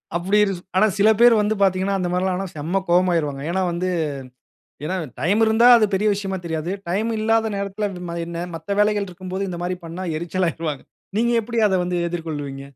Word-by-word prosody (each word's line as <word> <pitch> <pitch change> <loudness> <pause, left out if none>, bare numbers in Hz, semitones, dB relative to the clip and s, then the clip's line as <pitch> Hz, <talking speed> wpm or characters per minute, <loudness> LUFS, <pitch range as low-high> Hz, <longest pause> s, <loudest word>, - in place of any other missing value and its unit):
அப்டி 190 +5 +2 0.4
ஆனா 215 - +5
சில 205 +2 +5
பேர் 240 0 +7
வந்து 210 +1 0
பார்த்தீர்கங்கன்னா 195 0 +2
அந்த 180 -1 -1
மாதிரி 180 +1 0
எல்லாம் 185 -1 0
ஆனா 195 - -3
செம்ம 170 +6 -1
கோவமாகிடுவாங்க. 170 -6 +2
ஏன்னா 190 +2 0
வந்து 175 +2 -2 1.0
ஏன்னா 170 +5 -2 0.3
டைம் 190 +10 +2
இருந்தா 220 +2 +4
அது 220 -2 +4
பெரிய 205 +3 +1
விஷயமா 195 -1 -3
தெரியாது. 160 0 -3 0.2
டைம் 215 +6 0
இல்லாத 225 0 +1
நேரத்தில 200 +1 -2 0.4
என்ன 170 0 -4
மத்த 165 +5 -4
வேலைகள் 210 -1 +2
இருக்கும்போது 185 +2 -5
இந்த 175 -2 -5
மாதிரி 180 +1 -2
பண்ணா 170 +3 -6
எரிச்சல் 180 +2 -1
ஆகிருவாங்க. 155 -3 -4 0.4
நீங்க 235 +1 +2
எப்டி 230 +1 -4
அதை 190 - +1
வந்து 180 0 -2
எதிர்கொள்ளுவீங்க? 150 -5 -5
185 Hz, 180 wpm, -22 LUFS, 170-205 Hz, 1.0 s, பேர்